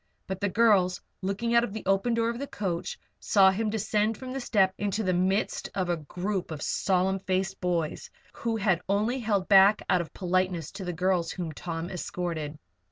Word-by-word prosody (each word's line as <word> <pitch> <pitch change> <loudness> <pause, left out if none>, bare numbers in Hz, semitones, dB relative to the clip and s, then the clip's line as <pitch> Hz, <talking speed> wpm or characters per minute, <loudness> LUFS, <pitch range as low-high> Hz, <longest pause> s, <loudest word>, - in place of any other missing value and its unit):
But 190 0 -5
the 205 - +1
girls, 200 -4 +3 0.2
looking 200 +5 -1
out 235 0 +5
of 210 - -4
the 220 - -6
open 195 +5 +2
door 230 0 +1
of 235 - -7
the 280 - -4
coach, 185 -8 -3 0.2
saw 195 -2 +5
him 215 +3 -1
descend 215 0 0
from 255 -1 -7
the 270 - -3
step 195 -6 +2
into 205 +1 -1
the 185 -2 +1
midst 190 +4 0
of 185 -2 -1
a 175 - +1
group 180 +5 -3
of 155 -2 -5
solemn 190 0 +1
faced 190 0 -2
boys 170 -4 -1 0.2
who 230 -1 -2
had 195 -5 +1
only 215 +6 +1
held 205 -5 0
back 200 +1 +6
out 180 - +4
of 160 -3 -8
politeness 185 -3 -1
to 195 0 -7
the 180 - -2
girls 180 -1 0
whom 175 -4 -4
Tom 165 +3 -5
escorted. 165 -4 -4
190 Hz, 195 wpm, -28 LUFS, 180-210 Hz, 0.2 s, back